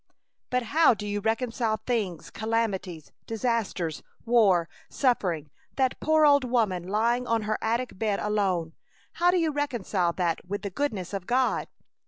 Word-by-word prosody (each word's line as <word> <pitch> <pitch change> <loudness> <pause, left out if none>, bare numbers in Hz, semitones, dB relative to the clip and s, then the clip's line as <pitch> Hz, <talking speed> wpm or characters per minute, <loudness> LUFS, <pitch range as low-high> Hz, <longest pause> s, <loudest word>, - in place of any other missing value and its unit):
"But 250 0 0
how 290 +2 +4
do 210 0 -6
you 205 0 -2
reconcile 225 0 0
things, 205 -8 -3
calamities, 200 -7 -2 0.2
disasters, 225 -8 -1 0.2
war, 205 -8 +4 0.2
suffering, 180 - 0 0.2
that 260 -2 +1
poor 315 0 +4
old 285 -2 +5
woman 215 -8 0
lying 235 +5 +1
on 230 -1 +1
her 215 +1 -1
attic 230 -2 -2
bed 210 -3 0
alone? 190 -6 0 0.5
How 350 - +6
do 360 - +3
you 325 -3 +1
reconcile 235 -11 -1
that 170 -3 -1
with 200 +3 -5
the 200 - -4
goodness 205 -7 -3
of 195 -2 -4
God?" 255 +1 +1
220 Hz, 150 wpm, -27 LUFS, 190-250 Hz, 0.5 s, How